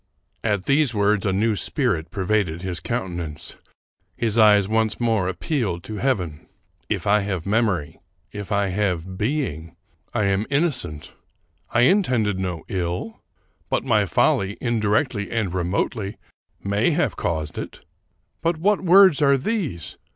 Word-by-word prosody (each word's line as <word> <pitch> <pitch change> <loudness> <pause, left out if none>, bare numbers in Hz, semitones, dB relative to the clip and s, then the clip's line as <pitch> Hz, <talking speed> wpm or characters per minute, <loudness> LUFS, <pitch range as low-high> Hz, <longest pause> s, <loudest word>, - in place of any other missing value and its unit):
At 105 -4 0
these 140 -4 +2
words 105 -1 +2
a - - +2
new 105 +3 +1
spirit 100 - 0
pervaded 95 -3 -1
his 90 -2 -3
countenance. 85 -7 -4 0.6
His 115 -2 0
eyes 105 -3 +6
once 110 0 0
more 110 -6 +1
appealed 95 - -2
to 110 - -6
heaven. 95 - -2 0.2
" - - -44
If - - -2
I 105 +1 +4
have 95 -4 -3
mem 110 +3 +2
ory 80 -7 -4 0.2
— - - -43
if 100 - -10
I 100 -1 +1
have 95 -2 -1
being 105 - -2 0.2
— 70 - -42
I 110 - 0
am 100 +2 +1
innocent. 125 - 0 0.6
I 120 - +2
intended 125 - +2
no 90 -4 -3
ill; 90 +4 -3 0.5
but - - 0
my - - +2
folly, 100 +1 +1
indirectly 110 -1 0
and 110 -6 -1
remotely, 95 +3 -2 0.5
may 100 +6 +1
have 170 +2 0
caused 80 -3 -3
it. - - -7 0.6
But 165 0 0
what 200 +5 +2
words 185 -4 +6
are 140 -1 +5
these 140 - -3
105 Hz, 150 wpm, -23 LUFS, 90-120 Hz, 0.6 s, eyes